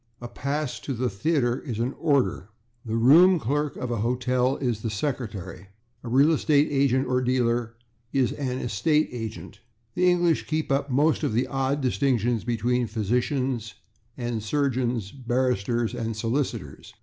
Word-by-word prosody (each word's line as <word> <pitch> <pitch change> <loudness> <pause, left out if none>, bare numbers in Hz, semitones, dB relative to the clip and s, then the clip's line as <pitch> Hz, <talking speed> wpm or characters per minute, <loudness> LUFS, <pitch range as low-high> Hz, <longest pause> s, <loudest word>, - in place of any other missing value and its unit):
A 120 - -7
pass 140 -1 -3
to 135 +1 -4
the 125 0 -1
theatre 120 +3 0
is 120 -8 -5
an 120 +4 -1
/order/. 140 - 0 0.4
The 110 -1 -3
room 165 +10 +6
clerk 145 +3 -1
of 125 - -4
a 120 - -1
hotel 125 +3 +1
is 120 -5 -2
the 115 - -2
/secretary/. 105 - -4 0.4
A 120 - -6
real 140 +6 +5
estate 150 -2 +3
agent 135 -2 +2
or 125 0 +1
dealer 120 -2 0 0.4
is 135 -3 +1
an 130 -3 -3
/estate 150 +8 +1
agent/. 115 -2 -7 0.3
The 180 0 +3
English 175 -2 +2
keep 155 -2 -2
up 140 +1 0
most 145 +5 +2
of 145 -7 -1
the 120 +4 +1
old 135 +2 -1
distinctions 125 -4 +1
between 120 +1 0
physicians 120 +2 -1 0.4
and 120 -3 -3
surgeons, 120 -3 -1
barristers 120 -3 -1
and 115 -2 -3
solicitors. 120 +5 -3
125 Hz, 150 wpm, -25 LUFS, 115-140 Hz, 0.4 s, room